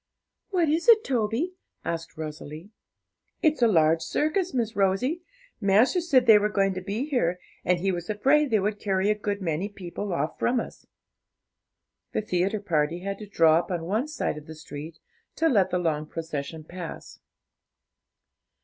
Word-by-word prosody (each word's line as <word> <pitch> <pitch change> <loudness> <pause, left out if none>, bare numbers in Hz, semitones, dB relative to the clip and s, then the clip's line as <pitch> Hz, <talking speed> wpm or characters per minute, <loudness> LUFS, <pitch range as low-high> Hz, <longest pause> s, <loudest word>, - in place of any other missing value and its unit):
'What 360 -5 +2
is 325 +9 +1
it, 445 -2 +7
Toby?' 245 +8 -1 0.3
asked 165 0 -4
Rosalie. 155 +3 -7 0.7
'It's 310 -4 +3
a 235 - +6
large 160 -5 +4
circus, 345 - 0
Miss 230 -4 -1
Rosie; 205 - +1 0.4
master 220 - +3
said 270 -7 +3
they 220 -3 +8
were 210 +1 +1
going 195 -2 +1
to 185 - -5
be 205 +7 -3
here, 185 - 0 0.2
and 180 0 +2
he 195 +2 +1
was 175 -1 -5
afraid 275 +8 +3
they 220 -3 +3
would 205 +1 -1
carry 195 0 +1
a - - +1
good 205 -1 -3
many 170 +4 -1
people 195 0 -6
off 155 -2 -2
from 245 0 +2
us.' - - -8 1.3
The - - 0
theatre 195 +2 0
party 165 -2 0
had 195 +1 -4
to 210 - -8
draw 165 -4 +4
up 170 - -5
on 175 -3 -2
one 215 - 0
side 300 - -3
of 150 - -17
the 160 - -8
street 155 +1 -9 0.4
to 325 - +2
let 205 - +3
the 180 - 0
long 155 -3 -1
procession 160 -1 -5
pass. 175 +1 -8
195 Hz, 170 wpm, -26 LUFS, 165-240 Hz, 1.3 s, they